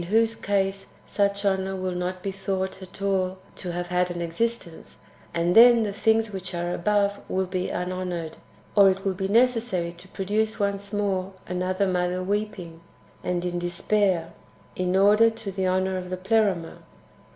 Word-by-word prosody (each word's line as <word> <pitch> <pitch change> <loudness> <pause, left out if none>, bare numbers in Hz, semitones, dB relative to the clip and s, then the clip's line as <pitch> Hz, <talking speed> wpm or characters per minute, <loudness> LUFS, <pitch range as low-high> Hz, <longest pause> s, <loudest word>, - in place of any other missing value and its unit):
whose 225 +2 +3
case 195 -2 -1 0.2
sucli 200 0 0
honour 190 -1 +1
will 185 0 -2
not 180 +1 -3
be 195 - -2
thono; 190 0 -2
ht - - -14
at 190 +1 -10
all 190 -1 0 0.2
to 180 - -5
have 175 0 -4
had 180 0 +1
an 175 -1 -4
existence, 170 +1 -3 0.3
and 170 +1 +1
then 235 0 +8
the 205 -2 -2
things 220 +1 +2
which 185 -1 -5
are 175 +1 -2
above 200 +2 +1
will 190 0 0
be 185 0 -2
unhonoured; 180 -2 -3 0.4
or 200 -2 +8
it 190 +1 -2
will 195 - +1
be 190 +1 -2
necessary 230 -5 +2
to 175 +2 -14
produce 210 +3 -1
once 200 0 -2
more 195 -2 -1
another 185 +2 -1
Mother 180 0 0
weeping, 185 -4 -3 0.4
and 180 0 -1
in 175 0 -2
despair, 175 0 0 0.4
in 185 0 0
order 210 +4 +6
to 225 -3 -7
the 190 -1 -1
honour 185 0 +1
of 180 0 -7
the 185 - -3
Pleroma. 190 -3 0
190 Hz, 170 wpm, -25 LUFS, 180-205 Hz, 0.4 s, then